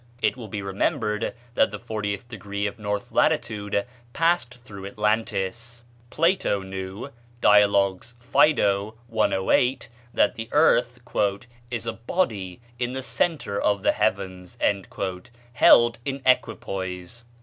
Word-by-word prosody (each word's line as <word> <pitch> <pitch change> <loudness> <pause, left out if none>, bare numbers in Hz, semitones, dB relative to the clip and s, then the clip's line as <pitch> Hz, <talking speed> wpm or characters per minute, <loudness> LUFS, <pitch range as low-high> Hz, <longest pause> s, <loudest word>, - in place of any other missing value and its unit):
It - - +1
will 120 -4 -8
be 100 0 -5
remembered 105 +3 -1 0.2
that - - +3
the - - -6
fortieth 110 -1 -4
degree 100 -3 -4
of 100 - -4
north 105 -1 -3
latitude 105 -1 +1 0.3
passed 165 -6 +1
through 100 -2 -8
Atlantis. 110 +2 -2 0.3
Plato 165 - +1
knew 95 +6 -6 0.3
("Dialogues, 100 +1 +3
Phædo," 110 -6 +2
108) 115 +4 +1 0.2
that - - +2
the 115 0 -7
earth - - +3 0.7
"is 115 -2 -3
a 115 - -2
body 110 - -2 0.2
in 125 0 -1
the 130 0 -4
centre 120 -3 -1
of 100 -2 +1
the - - +4
heavens" 95 -4 -2 1.0
held 120 0 +6
in 135 0 -4
equipoise. 95 -4 -1
110 Hz, 115 wpm, -25 LUFS, 100-120 Hz, 1.0 s, held